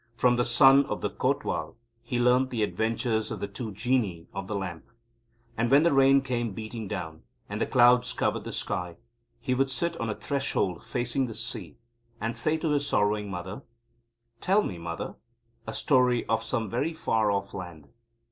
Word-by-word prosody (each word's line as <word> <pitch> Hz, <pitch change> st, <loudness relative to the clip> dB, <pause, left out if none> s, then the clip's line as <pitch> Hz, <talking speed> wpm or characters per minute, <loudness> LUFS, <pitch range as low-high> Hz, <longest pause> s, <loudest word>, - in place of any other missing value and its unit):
From 125 Hz, +1 st, +3 dB
the 120 Hz, 0 st, +1 dB
Son 135 Hz, +3 st, +6 dB
of -, -, -3 dB
the -, -, -1 dB
Kotwal -, -, -1 dB, 0.3 s
he 120 Hz, +1 st, -3 dB
learnt 125 Hz, +2 st, +3 dB
the 115 Hz, -4 st, -1 dB
adventures 110 Hz, +1 st, -1 dB
of -, -, -5 dB
the 100 Hz, -, -3 dB
Two 110 Hz, +3 st, -6 dB
Genii 105 Hz, -6 st, 0 dB
of 95 Hz, -1 st, -5 dB
the 105 Hz, -, -3 dB
Lamp. 90 Hz, -4 st, -5 dB, 0.7 s
And 115 Hz, +1 st, 0 dB
when 140 Hz, +4 st, +6 dB
the 170 Hz, -, +3 dB
rain 135 Hz, 0 st, +6 dB
came 120 Hz, -5 st, -2 dB
beating 110 Hz, 0 st, -6 dB
down, 80 Hz, -6 st, -5 dB, 0.3 s
and 105 Hz, +2 st, -5 dB
the -, -, +1 dB
clouds 125 Hz, -1 st, +5 dB
covered -, -, -1 dB
the -, -, -6 dB
sky, 90 Hz, -1 st, -3 dB, 0.4 s
he 125 Hz, +2 st, -1 dB
would 135 Hz, +1 st, +1 dB
sit 170 Hz, +6 st, -1 dB
on 115 Hz, -, -2 dB
the 105 Hz, -, -2 dB
threshold 135 Hz, -10 st, -1 dB
facing 125 Hz, +2 st, -1 dB
the 115 Hz, -, -7 dB
sea, 110 Hz, -8 st, -4 dB, 0.4 s
and 115 Hz, +2 st, -2 dB
say 155 Hz, +1 st, +1 dB
to 160 Hz, -1 st, -1 dB
his 145 Hz, -1 st, +1 dB
sorrowing 105 Hz, 0 st, +1 dB
mother: 95 Hz, +2 st, -6 dB, 0.8 s
"Tell 200 Hz, +3 st, +3 dB
me, 90 Hz, -, -5 dB
mother, 85 Hz, 0 st, -5 dB, 0.5 s
a -, -, -4 dB
story 125 Hz, -3 st, +2 dB
of 115 Hz, 0 st, +1 dB
some 115 Hz, -1 st, -2 dB
very 140 Hz, -, -1 dB
far 110 Hz, -8 st, +1 dB
off 100 Hz, -1 st, -1 dB
land." 85 Hz, -6 st, -8 dB
115 Hz, 185 wpm, -27 LUFS, 100-130 Hz, 0.8 s, Son